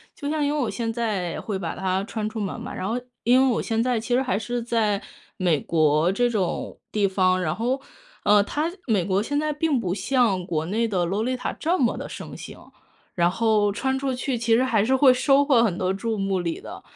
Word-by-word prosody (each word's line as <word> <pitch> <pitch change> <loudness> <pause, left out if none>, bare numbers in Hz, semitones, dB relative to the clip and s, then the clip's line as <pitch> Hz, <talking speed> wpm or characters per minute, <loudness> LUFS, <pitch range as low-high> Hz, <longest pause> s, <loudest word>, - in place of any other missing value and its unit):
就 285 - -5
像 300 -1 0
因 290 - 0
为 300 - -1
我 245 - 0
现 230 -2 -2
在 210 -7 -2
会 205 -3 -3
把 170 -4 -4
它 190 0 -1
穿 215 0 -3
出 220 - -6
门 200 -3 -3
嘛， - - -7
然 185 - -4
后 235 +3 -1 0.2
因 250 +3 +5
为 265 - +4
我 - - 0
现 225 -1 0
在 245 -1 +1
其 230 +2 -3
实 255 - +3
还 255 -5 0
是 240 +3 -3
在 220 -3 0 0.4
美 175 -6 +2
国 155 +2 +2
这 245 +5 +1
种 205 -6 -2
地 205 -2 +2
方， 185 -1 +2
然 160 -2 -1
后 250 +6 -1 0.4
呃， 205 0 +5
它 305 +10 -2
美 210 -7 +2
国 195 +2 0
现 290 +4 -1
在 305 0 0
并 300 -2 0
不 185 -4 -2
像 205 -4 +1
国 160 -2 -2
内 225 +5 0
的 185 -4 0
洛 200 +5 -1
丽 255 +1 -1
塔 250 - -3
这 345 +4 -1
么 240 - +1
的 - - -5
盛 - - -8
行。 - - -11 0.4
然 175 -1 +3
后 215 +1 +2
穿 265 +3 -1
出 270 -1 -1
去 250 0 -2
其 230 0 +2
实 245 - +3
还 220 -5 +2
是 265 +2 +3
会 260 -1 +6
收 275 +2 +4
获 270 -5 +4
很 200 -7 +1
多 185 0 0
注 220 +3 -2
目 195 -1 0
礼 170 -2 -3
的， - - -9
225 Hz, 255 characters per minute, -24 LUFS, 190-255 Hz, 0.4 s, 会